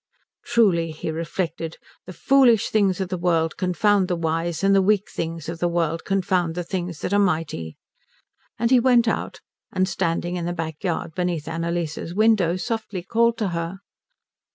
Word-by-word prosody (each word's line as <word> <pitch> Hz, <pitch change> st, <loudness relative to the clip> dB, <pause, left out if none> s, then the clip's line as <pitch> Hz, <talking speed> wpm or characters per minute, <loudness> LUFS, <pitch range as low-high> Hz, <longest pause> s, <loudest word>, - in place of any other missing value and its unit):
"Truly," 195 Hz, -9 st, +2 dB
he 155 Hz, 0 st, -5 dB
reflected, 165 Hz, 0 st, -4 dB, 0.3 s
"the -, -, -7 dB
foolish 240 Hz, -, +4 dB
things 200 Hz, -4 st, +2 dB
of 190 Hz, -2 st, -2 dB
the 185 Hz, -1 st, -3 dB
world 165 Hz, -2 st, +1 dB
confound 190 Hz, +2 st, +2 dB
the 180 Hz, -, 0 dB
wise, 165 Hz, +1 st, -2 dB
and 195 Hz, 0 st, +4 dB
the 195 Hz, -, +5 dB
weak 205 Hz, +1 st, +1 dB
things 165 Hz, -1 st, -4 dB
of 165 Hz, 0 st, -5 dB
the 175 Hz, -, +1 dB
world 165 Hz, -1 st, -1 dB
confound 185 Hz, -4 st, 0 dB
the 175 Hz, -, -2 dB
things 175 Hz, -2 st, -4 dB
that 195 Hz, -, -2 dB
are 205 Hz, -, +4 dB
mighty." 160 Hz, -, -1 dB, 0.8 s
And 230 Hz, +2 st, 0 dB
he 255 Hz, -, +7 dB
went 240 Hz, -1 st, +4 dB
out, 220 Hz, -, -2 dB, 0.3 s
and 185 Hz, 0 st, +1 dB
standing 175 Hz, -1 st, -1 dB
in 170 Hz, -, -3 dB
the 175 Hz, -, -2 dB
back 160 Hz, -1 st, -5 dB
yard 170 Hz, -3 st, -2 dB
beneath 175 Hz, -4 st, -2 dB
Annalise's 165 Hz, 0 st, -3 dB
window 210 Hz, -5 st, +3 dB
softly 210 Hz, -2 st, -4 dB
called 230 Hz, +4 st, +2 dB
to 210 Hz, -4 st, -1 dB
her. 170 Hz, +3 st, -4 dB
175 Hz, 175 wpm, -23 LUFS, 165-200 Hz, 0.8 s, he